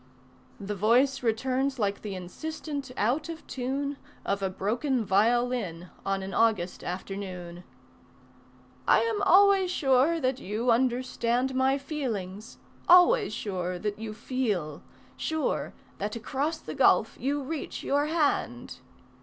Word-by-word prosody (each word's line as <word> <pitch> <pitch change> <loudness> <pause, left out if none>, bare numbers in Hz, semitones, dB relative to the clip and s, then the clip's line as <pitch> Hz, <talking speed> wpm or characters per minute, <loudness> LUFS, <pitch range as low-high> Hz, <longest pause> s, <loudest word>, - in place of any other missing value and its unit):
The 200 +1 -4
voice 245 +7 +3
returns 260 +4 0
like 200 -3 -1
the 205 -3 -5
insistent 285 - -6
out 260 +10 0
of 325 -1 -7
tune 275 +2 -3 0.3
Of 200 0 -1
a 190 - 0
broken 230 +6 -1
violin 210 -4 +1
on 195 0 -1
an 190 - -6
August 205 -6 +1
afternoon: 180 -1 -6 1.2
"I - - +6
am 450 -3 0
always 395 -1 +5
sure 285 0 +3
that 255 -2 0
you 225 +4 0
understand 250 +1 +1
My 260 +1 +2
feelings, 225 - -5 0.3
always 400 +6 +6
sure 180 -3 -3
that 205 +3 -3
you 220 -1 -6
feel, 205 - -2 0.4
Sure 315 -1 -1 0.3
that 210 +3 -3
across 275 +7 -2
the - - -8
gulf - - +4
you 285 +2 -1
reach 300 +2 -5
your 285 +2 +1
hand. 295 - -1
245 Hz, 125 wpm, -28 LUFS, 200-280 Hz, 1.2 s, I